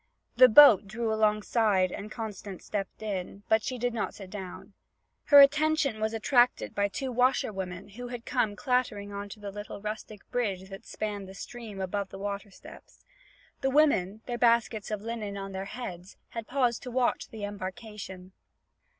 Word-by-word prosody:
The 255 +1 +8
boat 220 -6 +8
drew 220 +2 -2
alongside 210 -3 +2
and 210 +1 -7
Constance 210 -4 -7
stepped 205 +1 -4
in, 195 -1 -4
but 220 0 +4
she 255 +1 -4
did 245 0 -1
not 225 - -3
sit 190 -2 -10
down. 190 -3 -8 0.5
Her 285 -1 +9
attention 295 -4 +3
was 220 0 +1
attracted 240 +2 +2
by 200 0 +1
two 260 +6 -4
washer 250 -2 +2
women 185 0 -6
who 245 +5 -8
had 240 -1 -7
come 205 -2 0
clattering 215 -4 -1
on 200 0 -5
to 210 - -10
the 205 -1 -6
little 205 0 -7
rustic 210 0 -6
bridge 195 -6 -2
that 195 - -10
spanned 205 -3 -4
the 190 - -11
stream 225 -2 -8
above 190 +1 -2
the - - -9
water 200 +1 -4
steps. 190 - -15 0.6
The 270 - +1
women, 240 -9 +3
their 240 -1 -4
baskets 230 -3 +2
of 210 -1 -3
linen 220 -3 -4
on 195 0 -6
their 190 0 -4
heads, 195 -5 -8
had 230 -2 -6
paused 245 -3 +1
to 250 - -7
watch 250 0 0
the 220 -2 -8
embarkation. 195 -1 -7
215 Hz, 175 wpm, -29 LUFS, 200-240 Hz, 0.6 s, Her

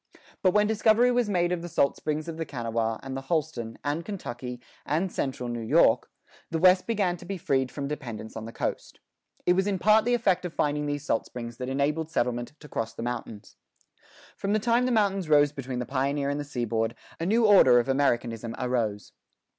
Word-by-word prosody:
But 185 0 +3
when 210 0 +5
discovery 220 +3 +4
was 245 -3 +1
made 175 -3 +1
of 180 -2 -1
the 175 - -6
salt 140 - +2
springs 155 +1 -3
of 165 -1 -5
the 165 - -2
Kanawha, 115 -5 -2
and 135 0 -5
the 135 - -4
Holston, 135 -6 -2
and 150 +3 -1
Kentucky, 125 - -6 0.2
and 170 +5 -1
central 130 -2 -3
New 120 -1 -3
York, 110 - +3 0.4
the 165 - -1
West 185 +2 +5
began 200 -6 0
to - - -13
be 195 +1 -4
freed 135 -6 0
from 140 -1 -4
dependence 115 -7 -6
on 110 -1 -6
the 115 - -7
coast. - - -4 0.5
It 180 - +5
was 190 +2 +1
in 200 -2 0
part 215 +4 +5
the 245 0 +3
effect 190 -6 +1
of 175 -2 -6
finding 150 0 0
these 145 0 -3
salt 115 - 0
springs 120 -1 -7
that 125 0 -4
enabled 150 +4 0
settlement 120 -3 -1
to 150 - -11
cross 115 -4 -4
the 115 - -5
mountains. 115 -3 -6 0.8
From 200 +1 -2
the 215 - +3
time 240 +3 +2
the - - 0
mountains 195 -6 +1
rose 145 -1 +5
between 130 -3 -5
the 125 - -2
pioneer 140 +2 -1
and 145 - -2
the - - -2
seaboard, 115 -4 -2 0.2
a 165 - -2
new 225 +3 +3
order 190 - +7
of 120 - +2
Americanism 120 -4 0
arose. 115 -5 -2
145 Hz, 210 wpm, -27 LUFS, 120-185 Hz, 0.8 s, order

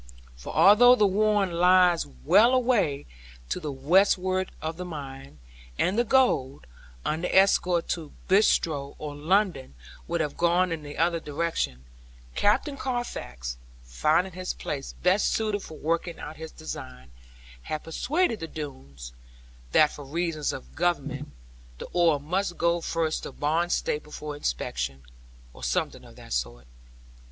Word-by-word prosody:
For - - -8
although 245 +5 +7
The 215 - +3
Warren 205 -1 +2
lies 180 0 +4
well 140 - +4
away 230 - +1 0.4
to - - -1
the 150 - -4
westward 185 +6 +2
of 160 +1 -4
the 180 - -5
mine; 135 - -8 0.4
and 185 - +1
the 240 - +3
gold, 220 - +2 0.4
under 165 +3 -1
escort 180 -3 +3
to 160 -4 -3 0.2
Bristowe, 160 -8 +2
or 150 -1 -6
London, 160 - 0 0.3
would 170 0 -1
have 150 -3 -2
gone 175 +1 +2
in 165 -2 -3
the 145 0 -9
other 170 +1 +2
direction; 145 - -3 0.5
Captain 275 +8 +1
Carfax, 60 - -4 0.3
finding 155 - +1
this 185 +1 -4
place 140 -2 -5
best 185 +3 +3
suited 215 -2 -1
for 155 - -10
working 170 +2 -2
of 150 +1 -7
his 160 0 -8
design, 65 - -9 0.5
had 155 - -5
persuaded 250 - 0
the 165 - -5
Doones, 70 - -8 0.6
that 150 - +5
for 145 - -9
reasons 155 +1 -2
of 130 - -9
Government, 145 -4 -1 0.5
the - - -7
ore 170 -4 +3
must 175 +5 -2
go 170 0 +1
first 165 -1 -1
to - - -7
Barnstaple 150 -1 -1
for 150 -1 -6
inspection, 65 - -3 0.5
or - - -13
something - - -1
of - - -15
that - - -9
sort. - - -3
165 Hz, 140 wpm, -26 LUFS, 140-185 Hz, 0.6 s, although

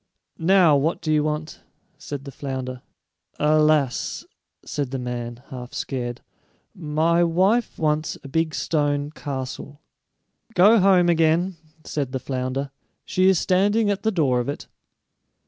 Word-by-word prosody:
"Now, 175 -2 +5
what 155 +5 0
do 155 - -1
you 150 -1 +3
want?" 155 +1 -4 0.4
said 145 -1 -7
the 140 - -7
flounder. 130 -2 -5 0.6
"Alas," 150 -3 +2 0.4
said 145 -3 -3
the 135 - -3
man, 120 -1 -5
half 125 -1 -8
scared, 120 -3 -4 0.5
"my 165 +1 +1
wife 190 +8 +2
wants 155 0 0
a - - -8
big 160 +3 -1
stone 145 -2 0
castle." 140 -1 -6 0.8
"Go 210 +5 +6
home 185 -2 +5
again," 170 +2 +2 0.3
said 140 -4 -3
the 130 - -1
flounder; 130 +1 -3 0.3
"she 185 +1 +3
is 190 - +4
standing 205 +5 +2
at 200 - -2
the 220 - +1
door 145 - +1
of 120 - -2
it." 145 - -5
150 Hz, 135 wpm, -23 LUFS, 135-175 Hz, 0.8 s, Go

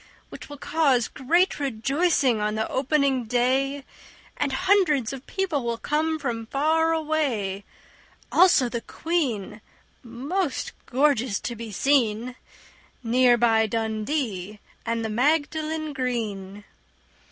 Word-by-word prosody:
Which - - -10
will 290 - -8
cause 275 -6 +1
great 340 +8 +1
rejoicing 270 -1 +1
on 210 0 -1
the 220 0 -1
opening 270 -2 +1
day 265 +4 0 0.5
And 285 -1 -1
hundreds 310 - +2
of 270 0 -9
people 355 -9 -1
will 235 -1 -2
come 315 +5 -1
from 235 -6 -4
far 320 +5 +2
away, 280 -12 -1 0.7
Also 350 -9 +5
the 235 -1 -4
Queen, 235 - -2 0.4
most 275 +8 -3 0.2
gorgeous 255 -5 +1
to 235 - -4
be 230 -1 -7
seen, 245 0 +1 0.7
Near 245 +1 +4
by 225 -2 +3
Dundee 215 - -3 0.3
and 230 0 -1
the - - -2
Magdalen 310 +5 0
Green. 210 -6 -4
255 Hz, 115 wpm, -25 LUFS, 225-300 Hz, 0.7 s, Also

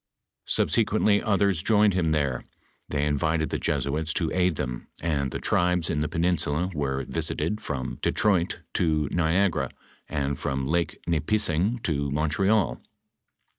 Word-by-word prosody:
Subsequently 110 -2 +2
others 100 -4 +2
joined 105 0 +4
him 90 -3 +1
there; 70 -5 0 0.5
they 75 -1 0
invited 80 +2 0
the - - -1
Jesuits 75 +3 -1
to 80 -3 0
aid 90 -2 +2
them, 60 -5 -4
and 75 -5 0
the - - -4
tribes 90 -1 +1
in 75 - 0
the 75 - 0
peninsula 85 0 0
were 70 -3 -2
visited 105 0 -2
from 65 -3 -4
Detroit 95 -5 +1
to 80 -3 +1
Niagara, 85 -4 +1 0.4
and 70 -1 -2
from 65 -1 -2
Lake 85 +4 0
Nipissing 85 - +1
to 70 -3 0
Montreal. 80 - +1
80 Hz, 130 wpm, -26 LUFS, 75-90 Hz, 0.5 s, joined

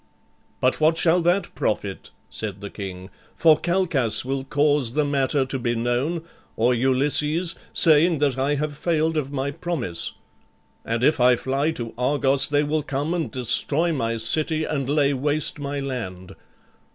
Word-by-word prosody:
"But 130 +4 0
what 160 +1 +3
shall 170 +1 +3
that 175 +4 0
profit," 100 -2 -3 0.2
said 105 -3 -5
the 100 0 -8
king; 95 -1 -8 0.2
"for 160 -2 +5
Calchas 160 - +1
will 135 0 -2
cause 145 -3 +1
the 150 +1 +1
matter 140 -1 +1
to 135 0 -4
be 120 -1 -1
known, 125 +8 -1 0.3
or 120 +3 +2
Ulysses, 150 +7 +1 0.2
saying 165 +1 +5
that 140 -3 +1
I 135 +2 0
have 145 0 -3
failed 160 +1 0
of 145 -3 -2
my 140 0 -2
promise; 140 - -3 0.7
and 115 +1 -2
if 150 +2 +3
I 125 0 +5
fly 135 +5 -1
to 115 -6 -6
Argos, 135 +1 +2
they 145 0 +2
will 150 +1 -1
come 145 +3 -3
and 170 -3 -2
destroy 145 +6 +1
my 115 -5 -2
city 155 +7 +1
and 140 -4 -3
lay 145 -1 +2
waste 145 +3 0
my 145 0 -4
land. 95 -9 -6
140 Hz, 160 wpm, -23 LUFS, 125-155 Hz, 0.7 s, for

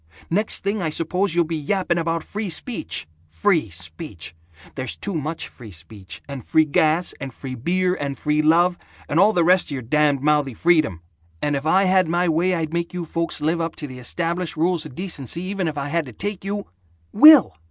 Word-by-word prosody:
Next 210 +5 +1
thing, 200 +1 -1
I 165 - 0
suppose 170 +4 -1
you'll 175 - +4
be 165 +1 -3
yapping 170 +3 0
about 165 0 -1
free 210 -1 -4
speech. 215 - -5 0.2
Free 105 - +1
speech! 85 0 -7 0.4
There's 130 -2 -5
too 200 - -5
much 155 0 -3
free 115 -4 -13
speech 90 +1 -12
and 140 -4 -7
free 155 +7 +3
gas 155 +3 +1
and 135 -1 -6
free 130 +1 -8
beer 180 +9 0
and 140 -5 -4
free 150 0 +1
love 170 +3 +3 0.3
and 155 - +1
all 205 +3 +6
the 175 -5 +2
rest 180 +2 +4
of 150 - -4
your 130 -3 -4
damned 145 +2 +2
mouthy 150 -4 +2
freedom, 155 - +2 0.4
and 145 - 0
if 140 +2 -3
I 190 +4 +4
had 185 -2 +3
my 175 +2 +1
way 175 +3 +2
I'd 160 -1 -3
make 170 +1 -2
you 175 -1 -3
folks 165 -1 -2
live 165 +3 0
up 165 - -3
to 150 - -6
the 130 -3 -9
established 170 +6 -2
rules 170 +1 +1
of 125 - -14
decency 170 - -4
even 190 -1 -2
if 155 -1 -4
I 140 0 -3
had 165 -1 -1
to 125 - -10
take 200 - -5
you 200 +1 -3 0.2
" 85 0 -37
"Will!" 300 +5 +8
165 Hz, 210 wpm, -22 LUFS, 140-180 Hz, 0.4 s, Will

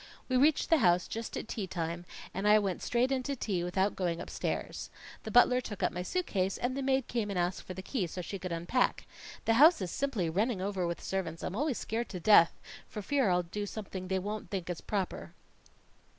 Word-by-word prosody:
We 255 - 0
reached 290 +6 +3
the 325 - +6
house 180 -5 +4
just 225 0 -5
at - - -5
tea 210 -5 -3
time, 170 -1 -3 0.3
and 195 +2 -1
I 210 0 +7
went 195 -4 -1
straight 245 +2 +1
in 265 -1 +1
to 280 +2 -3
tea 195 -8 -1
without 190 +3 0
going 175 -3 -1
upstairs. - - -4 0.3
The - - -6
butler 245 +3 +5
took 210 -5 -6
up - - +2
my 180 - -4
suit 365 - -1
case 190 - 0
and 250 +1 -1
the 275 - -2
maid 265 -1 +1
came 230 -4 -1
and 200 - -2
asked 175 +1 0
for 185 - -8
the 190 - -7
key 190 -3 -1
so 175 - -7
she 190 +3 -5
could 185 -1 -5
unpack. 170 +10 0 0.4
That 225 - +4
house 325 +3 +8
is 185 -3 -3
simply 255 -11 -1
running 205 +6 0
over 190 -2 -1
with 170 - -4
servants; 170 -4 -3
I'm 185 - -3
always 280 +1 0
scared 230 +2 -3
to 185 - -5
death 170 -2 +6 0.3
for 210 - -6
fear 270 -2 +2
I'll 180 0 +2
do 205 +4 -4
something 190 -3 -6
that - - -9
they 190 - +1
won't 205 +3 -4
think 180 -3 -3
is 175 - -6
proper. 195 -4 -3
200 Hz, 230 wpm, -31 LUFS, 180-240 Hz, 0.4 s, house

